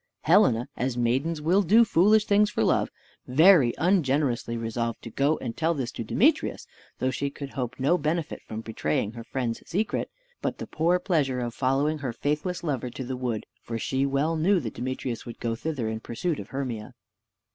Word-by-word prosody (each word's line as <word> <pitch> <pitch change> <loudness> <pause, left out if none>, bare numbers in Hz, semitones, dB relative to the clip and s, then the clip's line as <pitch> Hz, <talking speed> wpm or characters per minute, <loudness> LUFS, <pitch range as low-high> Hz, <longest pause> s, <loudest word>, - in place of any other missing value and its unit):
Helena 155 - +4
(as 125 0 -2
maidens 135 +7 0
will 180 +6 +4
do 215 +6 +5
foolish 210 +3 +4
things 205 +1 +4
for - - 0
love) - - +2 0.4
very 150 -1 +6
ungenerously 140 -9 +1
resolved 115 0 -2
to 115 - -8
go 145 +6 +2
and 115 -3 -5
tell 165 +1 +1
this 130 -5 -3
to - - -5
Demetrius, - - +1 0.3
though 130 +1 0
she 140 +2 -2
could 140 0 -8
hope 125 -2 -4
no 150 +7 +3
benefit 160 +2 -2
from 110 0 -7
betraying 105 -3 -1
her 115 0 -8
friend's 120 -1 -3
secret, 205 +4 -1 0.3
but - - -2
the - - -5
poor 170 +3 +1
pleasure 150 -9 0
of 120 -1 -3
following 140 +5 +1
her 130 -4 -3
faithless 150 +9 -2
lover 130 -6 -2
to 130 +2 -6
the 130 +1 -4
wood: 125 -4 -3 0.2
for 115 - -4
she 135 +4 0
well 140 +4 +1
knew 180 +5 +3
that 115 -8 -5
Demetrius 125 -1 -4
would 120 - -8
go 115 -1 -1
thither 130 -1 -3
in 110 0 -3
pursuit 150 +9 -3
of 100 - -7
Hermia. 125 -6 -5
135 Hz, 190 wpm, -26 LUFS, 120-165 Hz, 0.4 s, very